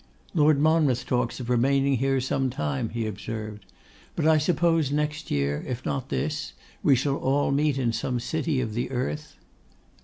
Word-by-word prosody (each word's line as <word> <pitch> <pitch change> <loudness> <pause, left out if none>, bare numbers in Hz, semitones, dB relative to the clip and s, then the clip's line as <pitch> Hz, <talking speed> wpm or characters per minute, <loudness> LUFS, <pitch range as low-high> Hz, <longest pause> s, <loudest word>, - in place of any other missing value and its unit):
'Lord 150 -3 +4
Monmouth 150 -5 +3
talks 125 -1 -1
of 125 - -5
remaining 135 +3 +2
here 135 +2 +1
some 130 +1 0
time,' 75 - -2
he 115 -1 -3
observed; 105 +1 -6 0.5
'but 160 - -1
I 160 -1 +5
suppose 165 -2 +2
next 150 +1 -2
year, 70 0 0
if 125 0 -4
not 135 -1 -2
this, 150 +1 -2 0.3
we 140 - +5
shall 135 +2 0
all 140 +1 +1
meet 145 0 +2
in 120 -4 0
some 120 +2 -1
city 150 +1 -1
of 110 -4 -3
the 120 +2 -2
earth? 145 +4 -3
135 Hz, 165 wpm, -26 LUFS, 120-150 Hz, 0.5 s, I